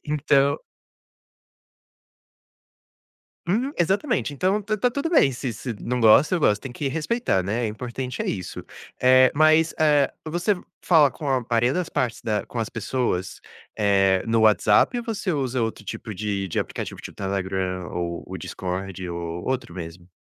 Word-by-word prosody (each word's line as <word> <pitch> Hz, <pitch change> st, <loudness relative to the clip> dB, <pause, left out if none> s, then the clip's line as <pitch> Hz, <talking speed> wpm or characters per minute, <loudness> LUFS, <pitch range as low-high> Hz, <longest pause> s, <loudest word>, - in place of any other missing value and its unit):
Então 140 Hz, -2 st, +2 dB, 2.9 s
Hum, 235 Hz, +10 st, 0 dB
exatamente, 195 Hz, -, 0 dB
então 185 Hz, +8 st, +1 dB
tá 215 Hz, +1 st, -2 dB
tá 245 Hz, +4 st, +1 dB
tudo 280 Hz, +5 st, -2 dB
bem, 305 Hz, -, +4 dB
se 125 Hz, -1 st, -4 dB
se 120 Hz, +4 st, -5 dB
não 125 Hz, +1 st, -2 dB
gosta, 115 Hz, -, +6 dB
eu 180 Hz, -, +2 dB
gosto, 105 Hz, -8 st, +3 dB
tem 135 Hz, -, -6 dB
que 135 Hz, +3 st, -3 dB
respeitar, 160 Hz, -, 0 dB
né, 105 Hz, +6 st, -1 dB
o -, -, 0 dB
importante 125 Hz, +4 st, -5 dB
é -, -, -5 dB
isso. 95 Hz, -3 st, -4 dB, 0.3 s
Eh, 130 Hz, 0 st, +6 dB
mas, 155 Hz, +2 st, +5 dB
eh, 150 Hz, -3 st, +4 dB
você 175 Hz, +6 st, 0 dB, 0.3 s
fala 155 Hz, -6 st, +5 dB
com 145 Hz, +3 st, -5 dB
a 130 Hz, -3 st, 0 dB
maioria 120 Hz, +1 st, +2 dB
das 180 Hz, +3 st, -1 dB
partes 120 Hz, -2 st, -2 dB
da 105 Hz, -2 st, -1 dB
com -, -, -8 dB
as 115 Hz, -1 st, -1 dB
pessoas, 110 Hz, -5 st, -2 dB, 0.4 s
eh, 95 Hz, -2 st, +3 dB
no 115 Hz, 0 st, +2 dB
WhatsApp 105 Hz, -, +4 dB
ou 240 Hz, -, -3 dB
você 215 Hz, -5 st, -2 dB
usa 130 Hz, -4 st, -1 dB
outro 110 Hz, -2 st, -3 dB
tipo 110 Hz, -, -6 dB
de 100 Hz, -1 st, -2 dB
de 85 Hz, -, -5 dB
aplicativo, -, -, -4 dB
tipo, -, -, -9 dB
Telegram 95 Hz, -2 st, -2 dB
ou 85 Hz, -1 st, -4 dB
o -, -, -7 dB
Discord 95 Hz, 0 st, -5 dB
ou 85 Hz, 0 st, -5 dB
outro 130 Hz, -9 st, -3 dB
mesmo? 85 Hz, +1 st, -8 dB
125 Hz, 165 wpm, -24 LUFS, 100-155 Hz, 2.9 s, gosta